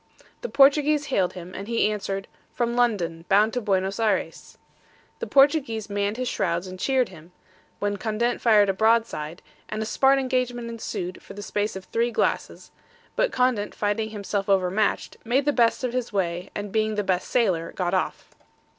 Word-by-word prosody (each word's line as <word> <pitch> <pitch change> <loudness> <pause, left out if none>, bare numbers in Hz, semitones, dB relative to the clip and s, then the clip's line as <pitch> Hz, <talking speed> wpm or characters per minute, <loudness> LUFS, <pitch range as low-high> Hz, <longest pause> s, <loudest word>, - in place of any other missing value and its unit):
The 485 - -4
Portuguese 290 +2 +4
hailed 185 -2 +2
him, 180 0 -9
and 200 +2 -7
he 230 -2 +2
answered, 195 -2 -4 0.2
from 235 0 -1
London, 185 -9 0
bound 210 +3 +4
to 250 - -1
Buenos 195 -1 0
Ayres. 220 -2 -1 0.6
The 470 - -4
Portuguese 270 -7 +3
manned 205 +2 -1
his 255 0 -2
shrouds 170 -3 -1
and 185 0 -8
cheered 260 +2 +1
him, 170 0 -15 0.4
when 205 0 -1
Condent 225 +4 -1
fired 215 -3 +5
a 195 - +2
broadside, 220 -6 +1 0.3
and 215 - -4
a 220 - -1
smart 270 +5 +3
engagement 250 -3 -1
ensued 185 -5 -5
for - - -12
the 205 - -7
space 205 0 -2
of 190 - -6
three 235 +1 0
glasses; 235 - -2 0.4
but - - +1
Condent 250 -5 0
finding 210 +1 -1
himself 205 -1 -3
over 185 -2 +3
matched, 215 +2 0
made 260 +5 +1
the 290 - +2
best 235 0 +2
of 250 -1 -1
his 250 -2 -2
way, 180 -3 -2
and 205 -1 -4
being 215 0 0
the 210 - 0
best 185 -2 0
sailer, 180 -9 +1
got 180 -1 -2
off. 185 - -2
215 Hz, 180 wpm, -25 LUFS, 195-245 Hz, 0.6 s, fired